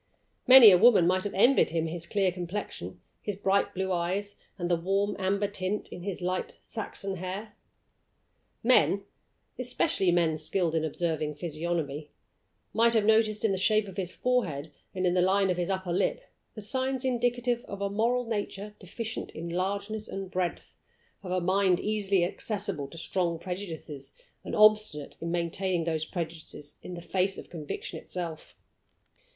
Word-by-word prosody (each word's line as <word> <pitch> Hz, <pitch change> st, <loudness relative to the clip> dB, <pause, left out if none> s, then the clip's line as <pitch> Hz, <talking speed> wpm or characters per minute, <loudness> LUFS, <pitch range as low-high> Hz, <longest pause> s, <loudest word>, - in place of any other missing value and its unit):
Many 255 Hz, -5 st, +11 dB
a 180 Hz, -, +6 dB
woman 215 Hz, -5 st, +7 dB
might 185 Hz, +2 st, +2 dB
have 205 Hz, -, -3 dB
envied 240 Hz, +7 st, +5 dB
him 165 Hz, 0 st, -1 dB
his 170 Hz, +1 st, -5 dB
clear 195 Hz, -1 st, +1 dB
complexion, 175 Hz, -, -5 dB, 0.2 s
his 205 Hz, -, -3 dB
bright 195 Hz, 0 st, +1 dB
blue 190 Hz, 0 st, -1 dB
eyes, 185 Hz, +4 st, -1 dB, 0.2 s
and 175 Hz, -2 st, -2 dB
the 175 Hz, -, +3 dB
warm 195 Hz, +4 st, 0 dB
amber 195 Hz, +2 st, +1 dB
tint 200 Hz, +1 st, -3 dB
in 175 Hz, -, -7 dB
his 185 Hz, -1 st, -4 dB
light 185 Hz, +1 st, -2 dB
Saxon 200 Hz, -3 st, -5 dB
hair. 190 Hz, +4 st, -5 dB, 1.1 s
Men 225 Hz, -4 st, +4 dB, 0.6 s
especially 190 Hz, -, +1 dB
men 165 Hz, -3 st, +2 dB
skilled 165 Hz, +2 st, +1 dB
in 160 Hz, -1 st, +1 dB
observing 155 Hz, -1 st, -1 dB
physiognomy 155 Hz, -2 st, -3 dB, 0.6 s
might 230 Hz, +1 st, +4 dB
have 215 Hz, -2 st, +3 dB
noticed 220 Hz, -1 st, +3 dB
in 215 Hz, -, +3 dB
the 190 Hz, -, 0 dB
shape 215 Hz, +1 st, +3 dB
of 195 Hz, -, -10 dB
his 185 Hz, -2 st, -2 dB
forehead 170 Hz, -, -1 dB, 0.2 s
and 185 Hz, 0 st, 0 dB
in 175 Hz, -, +3 dB
the 180 Hz, -, +3 dB
line 190 Hz, +1 st, +3 dB
of 180 Hz, -, -1 dB
his 175 Hz, +1 st, -1 dB
upper 190 Hz, -2 st, -1 dB
lip 180 Hz, -, +1 dB, 0.4 s
the 215 Hz, -, -7 dB
signs 260 Hz, +4 st, 0 dB
indicative 245 Hz, -1 st, 0 dB
of 200 Hz, -, -7 dB
a 200 Hz, -, 0 dB
moral 235 Hz, +5 st, +1 dB
nature 210 Hz, -2 st, -4 dB
deficient 220 Hz, +5 st, -5 dB
in 170 Hz, +1 st, -6 dB
largeness 200 Hz, +4 st, -2 dB
and 195 Hz, -1 st, -6 dB
breadth 180 Hz, -1 st, -3 dB, 0.5 s
of 190 Hz, -, -8 dB
a 185 Hz, -, +2 dB
mind 185 Hz, 0 st, +2 dB
easily 200 Hz, -3 st, +1 dB
accessible 195 Hz, -5 st, -2 dB
to 165 Hz, -, -12 dB
strong 170 Hz, 0 st, 0 dB
prejudices, 160 Hz, -6 st, -6 dB, 0.3 s
and -, -, -4 dB
obstinate 215 Hz, -8 st, +4 dB
in 165 Hz, -, -3 dB
maintaining 175 Hz, +1 st, -1 dB
those 160 Hz, -1 st, -1 dB
prejudices 160 Hz, -3 st, -6 dB
in 180 Hz, -, -7 dB
the 170 Hz, -, -8 dB
face 190 Hz, +1 st, 0 dB
of -, -, -10 dB
conviction 155 Hz, -4 st, -5 dB
itself. 170 Hz, -3 st, -6 dB
185 Hz, 165 wpm, -29 LUFS, 170-205 Hz, 1.1 s, Many